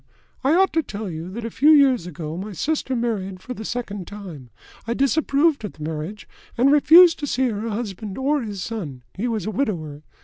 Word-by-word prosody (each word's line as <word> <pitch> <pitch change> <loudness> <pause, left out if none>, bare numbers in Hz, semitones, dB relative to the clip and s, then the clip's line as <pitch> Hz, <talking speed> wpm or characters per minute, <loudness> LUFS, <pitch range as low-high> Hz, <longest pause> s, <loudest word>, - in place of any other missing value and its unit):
I 280 +5 +3
ought 385 +2 +3
to 325 - +3
tell 210 - -6
you, 165 +2 -6
that 225 +4 -6
a 230 - -4
few 295 +7 +3
years 270 - +5
ago 160 -2 -6
my 200 +4 -6
sister 275 - -1
married 205 -6 -2
for 250 - -7
the 220 - -8
second 205 -6 -5
time. 180 -12 -9 0.4
I 235 - -1
disapproved 285 +1 +2
of 210 - -5
the 155 - -10
marriage, 160 +7 -5 0.3
and 260 +4 +4
refused 330 +4 +7
to 290 - -3
see 260 -1 +1
her 220 +1 -3
husband 205 -2 -5
or 280 +2 +1
his 205 -5 -5
son 155 - -6
he 225 +6 -3
was 220 -6 -2
a 215 - -2
widower. 165 - -3
220 Hz, 205 wpm, -22 LUFS, 185-270 Hz, 0.4 s, refused